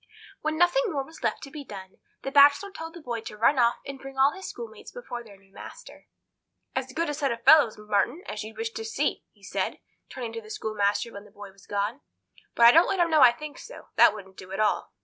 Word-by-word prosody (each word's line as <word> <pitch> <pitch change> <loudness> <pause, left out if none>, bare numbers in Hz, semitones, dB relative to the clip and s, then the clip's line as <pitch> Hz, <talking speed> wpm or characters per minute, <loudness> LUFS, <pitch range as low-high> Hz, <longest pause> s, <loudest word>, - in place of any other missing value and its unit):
When 310 0 -2
nothing 350 +9 +3
more 280 -3 -2
was 320 - -15
left - - -1
to 275 - -9
be 295 -1 -7
done, 190 -6 -10 0.3
the 270 - -4
Bachelor 285 +8 +5
told 325 -3 -8
the 340 - -10
boy 235 -5 -4
to 210 - -9
run 255 +5 +3
off 235 0 +4
and 275 -1 -7
bring 270 0 -10
all 270 +2 +5
his 380 +2 -8
schoolmates 470 -1 -9
before 245 - -7
their 205 -3 -15
new 195 0 -27
master. - - -12 0.7
"As 260 0 -3
good 330 +4 -1
a 295 - -2
set 280 -2 -1
of 235 0 -5
fellows, 290 -8 +6
Marton, 210 - -1
as 210 0 -5
you'd 220 +1 -10
wish 455 0 -3
to 450 - -6
see," 445 - -1
he - - -28
said, - - -3 0.3
turning 240 -3 -6
to 230 - -5
the 215 - -15
schoolmaster 215 +1 -1
when 200 +1 -10
the - - -16
boy 200 0 -11
was 195 0 -21
gone; 205 +7 -2 0.5
"but 235 - +6
I 235 - +10
don't 330 +6 +6
let 385 - -1
'em 340 -1 +2
know 310 -2 +5
I 250 -2 +9
think 295 +3 -9
so. - - -12
That 210 - +6
wouldn't 190 -2 -12
do 185 0 -11
at 195 - -4
all." 215 -1 0
260 Hz, 245 wpm, -26 LUFS, 210-310 Hz, 0.7 s, I